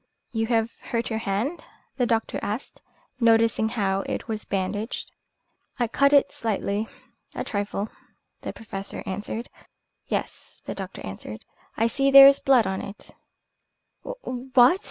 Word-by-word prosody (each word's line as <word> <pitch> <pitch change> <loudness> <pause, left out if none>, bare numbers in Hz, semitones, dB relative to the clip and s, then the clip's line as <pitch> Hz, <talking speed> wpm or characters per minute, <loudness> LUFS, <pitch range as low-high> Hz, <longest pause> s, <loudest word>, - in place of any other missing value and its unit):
"You 225 -1 -1
have 225 -1 +1
hurt 230 0 -3
your 220 - 0
hand?" 220 - -2 0.3
the 245 -2 +2
doctor 225 -1 0
asked, 215 +6 -5 0.4
noticing 225 -1 +4
how 195 -4 0
it - - -3
was 220 -2 -4
bandaged. 200 +4 -3 0.7
"I 240 -2 +1
cut 280 +5 +3
it 285 -1 +5
slightly 215 -1 -2 0.5
a - - -2
trifle," 205 0 -2 0.5
the - - -4
Professor 195 -3 -7
answered. 210 +4 -4 0.6
"Yes," - - -4
the - - -4
doctor 195 -1 -7
answered, 100 +3 -8 0.3
"I 225 - +3
see 275 +4 +2
there 275 0 +11
is 275 0 +7
blood 260 -5 +4
on 190 0 -2
it." 200 - -10 0.9
"What?" 260 - +2
225 Hz, 135 wpm, -25 LUFS, 205-250 Hz, 0.9 s, there